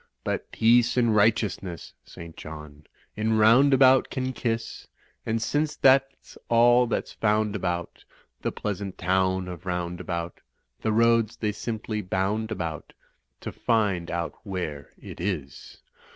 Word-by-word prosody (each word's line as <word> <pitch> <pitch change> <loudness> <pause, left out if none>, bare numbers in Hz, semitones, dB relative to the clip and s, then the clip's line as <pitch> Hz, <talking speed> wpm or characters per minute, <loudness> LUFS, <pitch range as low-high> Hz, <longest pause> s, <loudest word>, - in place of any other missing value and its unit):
But - - -3
peace 120 +2 +3
and 120 -3 +3
righteousness 105 -5 0
(St. 85 -1 -11
John) 75 -1 -10 0.3
In 110 +1 0
Roundabout 130 +4 +5
can 130 0 -3
kiss. 115 -2 -4 0.4
And 115 +1 0
since 150 +6 -1
that's 135 0 +2
all 120 +1 +5
that's 115 - -3
found 105 -1 0
about 90 -3 -3 0.4
The - - -1
pleasant 100 -2 -5
town 95 0 0
of 90 0 -9
Roundabout, 90 -1 -4 0.4
The 110 - 0
roads 115 0 +3
they 105 -2 -1
simply 110 0 -4
botmd 105 +3 -1
about 85 -8 -5 0.5
To - - -5
find 105 -7 0
out 85 -1 -3
where 90 -8 -5
it - - -10
is. 80 -8 -5
105 Hz, 125 wpm, -26 LUFS, 90-115 Hz, 0.5 s, Roundabout